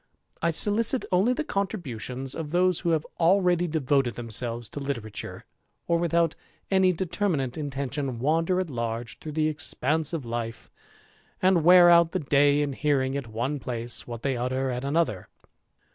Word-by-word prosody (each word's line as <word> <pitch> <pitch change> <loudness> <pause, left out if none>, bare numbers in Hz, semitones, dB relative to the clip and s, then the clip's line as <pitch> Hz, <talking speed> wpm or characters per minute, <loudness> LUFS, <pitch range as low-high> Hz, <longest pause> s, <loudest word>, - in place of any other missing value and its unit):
I 170 - +2
solicit 215 - +2
only 195 +7 +3
the 310 - -2
contributions 135 - -3
of 160 -3 -5
those 180 +1 +2
who 175 - -1
have 160 -2 +1
already 175 0 +3
devoted 140 -5 0
themselves 120 0 -2
to - - -6
literature, 120 -7 -5 0.4
or, 170 -1 +2
without 170 -1 +1 0.4
any 190 -1 +4
determinate 170 -7 -1
intention, 140 -3 -3
wander 165 +8 +1
at 180 -5 -3
large 115 -2 -4
through 155 - -7
the 155 0 +1
expanse 155 0 -1
of 160 -7 -4
life, 115 0 -5 0.7
and 185 -3 +3
wear 175 +1 +8
out 170 -1 +5
the 185 - 0
day 145 -1 +3
in 140 -1 -3
hearing 135 -2 0
at 140 -4 -4
one 120 +6 -3
place 120 -2 -4
what 120 -1 -7
they 135 -2 0
utter 130 +2 -1
at 125 +1 -4
another. 140 - -1
145 Hz, 160 wpm, -26 LUFS, 125-170 Hz, 0.7 s, wear